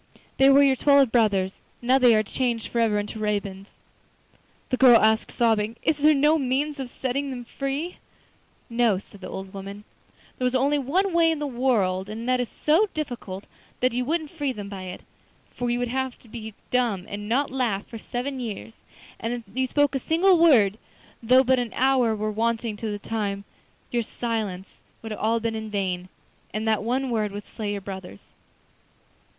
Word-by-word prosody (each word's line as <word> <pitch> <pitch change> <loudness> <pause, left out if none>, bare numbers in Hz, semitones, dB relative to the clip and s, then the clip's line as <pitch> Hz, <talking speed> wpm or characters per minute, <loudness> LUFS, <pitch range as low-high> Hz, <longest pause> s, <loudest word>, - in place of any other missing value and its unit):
They 270 0 +6
were 275 +1 +7
your 270 -1 +4
twelve 280 -1 +4
brothers. 200 -5 +2 0.2
Now 255 +2 +3
they 245 -3 +6
are 215 - +3
changed 235 +1 -2
for 235 - -1
ever 220 -2 +2
into 205 +1 -4
ravens.' 200 -2 -3 1.0
The 255 - +2
girl 250 -3 +8
asked, 220 +1 +3
sobbing: 225 -1 +1
'Is 315 - +2
there 300 +1 +5
no 300 +3 +4
means 280 +3 -1
of 260 -2 -4
setting 270 +3 -2
them 245 -2 -6
free?' 280 +8 -4 0.7
'No,' 235 -4 +2
said 200 +1 -13
the - - -7
old 190 0 -7
woman, 200 +1 -8 0.6
'there 250 - +2
is 250 - -1
only 280 +3 +2
one 355 +8 0
way 335 -1 +4
in 325 - 0
the 295 0 -3
whole 260 - -8
world, 195 -7 +1
and 225 +3 -6
that 255 0 +2
is 245 - -2
so 340 +8 +2
difficult 240 -10 -5 0.4
that 255 0 +2
you 250 +1 0
won't 310 +2 -2
free 290 -5 -2
them 205 -5 -7
by 190 -2 -7
it, 180 0 -7 0.5
for 245 -1 -3
you 240 - +1
would 245 0 -1
have 260 0 -2
to - - -18
be 220 -2 -8 0.2
dumb 230 -7 +1
and 205 +1 -6
not 275 +4 +1
laugh 235 -7 -1
for 225 - -9
seven 260 +4 -4
years, 225 -2 -6 0.5
and 230 +1 -2
if 240 -1 -5
you 260 0 0
spoke 290 +1 +2
a 270 - 0
single 345 +6 +3
word, 225 - +5 0.4
though 255 +3 +5
but 260 0 +3
an 240 -2 -3
hour 255 -4 +3
were 215 0 -2
wanting 225 0 -1
to 220 +1 -4
the 205 - -3
time, 205 -2 -3 0.5
your 240 - +1
silence 215 -5 -4 0.3
would 225 -1 -5
all 220 +2 0
have 230 - -2
been 230 -1 0
in 220 0 -5
vain, 185 -3 -2 0.5
and 215 +1 -2
that 220 -1 +2
one 250 +4 -1
word 215 -3 0
would 205 0 -7
slay 210 -2 -4
your 200 - -4
brothers. 190 - -9
235 Hz, 195 wpm, -25 LUFS, 210-265 Hz, 1.0 s, girl